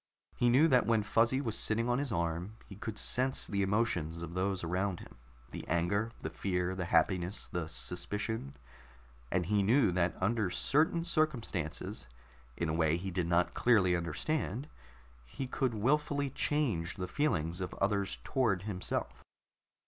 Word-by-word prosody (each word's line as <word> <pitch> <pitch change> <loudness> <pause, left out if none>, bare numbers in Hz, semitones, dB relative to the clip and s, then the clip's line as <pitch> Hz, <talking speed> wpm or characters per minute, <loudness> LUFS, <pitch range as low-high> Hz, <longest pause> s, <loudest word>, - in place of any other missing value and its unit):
He 120 - +3
knew 135 +7 +6
that 130 -5 +4
when 115 -2 +3
Fuzzy 115 +5 +2
was 115 -6 -1
sitting 115 +2 +1
on 120 +1 +1
his 140 -3 -2
arm 85 +3 -2
he 100 - -11
could 105 +2 -6
sense 130 +4 +1
the 100 -1 -1
emotions 95 -6 0
of 85 0 -6
those 95 0 -1
around 90 +2 -1
him - - -13 0.3
the - - -6
anger, 90 +7 +1
the 80 - -4
fear, 90 0 -1
the 95 -1 -3
happiness, 90 +2 +1
the 85 -2 -3
suspicion 85 - -3 0.7
and 90 -1 +1
he 105 +3 +2
knew 115 +2 +4
that 85 -1 +1
under 105 +1 +1
certain 155 - +2
circumstances, 120 - -2 0.5
in 85 - -1
a 80 - -1
way 80 0 +2
he 95 +2 -5
did 90 -1 -1
not 85 0 +2
clearly 100 -7 +4
understand, 110 - -2 0.6
he - - -6
could 130 -2 -1
wilfully 145 +4 +1
change 120 - 0
the 90 -1 -4
feelings 90 - 0
of 90 - -4
others 100 0 0
toward 115 -9 +1
himself. 95 -3 -4
100 Hz, 155 wpm, -32 LUFS, 85-120 Hz, 0.7 s, knew